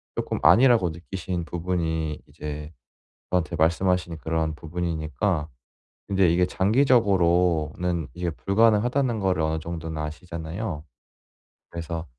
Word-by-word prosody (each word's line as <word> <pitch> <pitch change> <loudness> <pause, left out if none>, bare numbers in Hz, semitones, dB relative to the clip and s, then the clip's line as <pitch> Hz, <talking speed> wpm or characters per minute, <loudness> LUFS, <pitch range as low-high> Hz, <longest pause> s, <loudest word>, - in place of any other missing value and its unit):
쪼끔 - - -2
아니라고 120 -7 +6
느끼신 85 +1 -5
부분이 80 -3 -2
이제 75 +1 -7 0.6
저한테 85 -2 0
말씀하신 85 +1 +1
그러한 80 0 -1
부분이니까 80 0 -2 0.6
근데 95 -3 +3
이게 90 +2 +3
장기적으로는 90 - +2
이게 90 0 -2
불가능하다는 115 - +2
거를 95 -4 +1
어느 80 0 0
정도는 80 -1 -5
아시잖아요. 80 +2 -5 0.9
그래서 85 -1 -5
85 Hz, 305 characters per minute, -25 LUFS, 80-95 Hz, 0.9 s, 아니라고